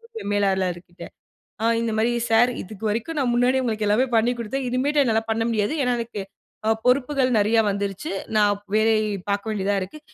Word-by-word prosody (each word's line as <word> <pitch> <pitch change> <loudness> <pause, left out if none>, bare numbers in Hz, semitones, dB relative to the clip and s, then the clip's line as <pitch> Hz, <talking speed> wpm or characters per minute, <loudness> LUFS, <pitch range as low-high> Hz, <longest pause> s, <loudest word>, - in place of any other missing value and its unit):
போய் 445 - -6
மேலாளர் 190 -3 +1
கிட்ட, 175 - -12 0.6
அ - - 0 0.2
இந்தமாரி 225 0 0 0.2
சார்! 240 +2 +5
இதுக்கு 210 +2 -11
வரைக்கும் 235 +10 -3
நான் 255 -3 +1
முன்னாடியே 250 +2 +2
உங்களுக்கு 220 -3 -1
எல்லாமே 215 +6 +3
பண்ணி 225 +2 +3
கொடுத்தேன், 255 +4 -3
இனிமேட்டு 280 +4 +1
என்னால 225 -3 +1
பண்ண 225 0 0
முடியாது. 215 +2 0
ஏன்னா, 250 -1 +1
எனக்கு 230 -3 -5 0.5
அ - - +3 0.2
பொறுப்புகள் 260 +1 +2
நிறையா 215 +2 +3
வந்துருச்சு. 200 -1 -3 0.3
நான் 205 -1 +4 0.2
வேலை 220 +1 +4 0.3
பார்க்க 200 +2 -1
வேண்டியதா 205 -1 0
இருக்கு. 185 +12 -7
225 Hz, 170 wpm, -23 LUFS, 205-250 Hz, 0.6 s, சார்